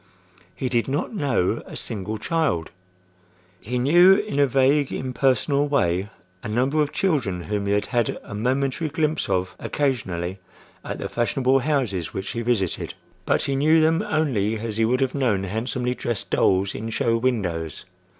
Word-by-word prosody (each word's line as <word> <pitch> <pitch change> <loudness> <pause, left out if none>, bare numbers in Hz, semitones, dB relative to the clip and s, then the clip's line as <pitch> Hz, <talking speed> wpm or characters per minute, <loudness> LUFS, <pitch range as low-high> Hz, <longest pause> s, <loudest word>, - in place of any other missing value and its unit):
He 130 - -2
did 120 -2 0
not 140 - -2
know 140 - 0
a - - -9
single 105 +1 -4
child.—He 90 - -5
knew 175 +9 +6
in 205 -8 -2
a 140 - +5
vague, 135 +2 +3
impersonal 135 +3 +1
way 95 -9 +1 0.3
a - - -6
number 130 +7 +1
of 145 - 0
children 125 - 0
whom 100 0 -2
he 100 - +2
had 105 - +1
had 120 -3 0
a - - -9
momentary 130 +7 0
glimpse 155 +1 -1
of 95 0 -1
occasionally 95 -10 -2 0.4
at - - -5
the - - -4
fashionable 130 +3 +1
houses 125 - -1
which 95 +1 -3
he 115 - -3
visited; 110 -8 -1 0.3
but - - +2
he 140 - -1
knew 155 +4 +4
them 160 +3 +3
only 135 - 0
as 110 -1 -5
he 115 - +3
would 125 +4 +1
have 130 -1 +1
known 115 -9 +1
handsomely 120 +5 -2
dressed 120 -4 -4
dolls 95 +1 +2
in 110 +2 -5
show 115 +1 +1
windows. 95 - -2
120 Hz, 160 wpm, -23 LUFS, 100-140 Hz, 0.4 s, knew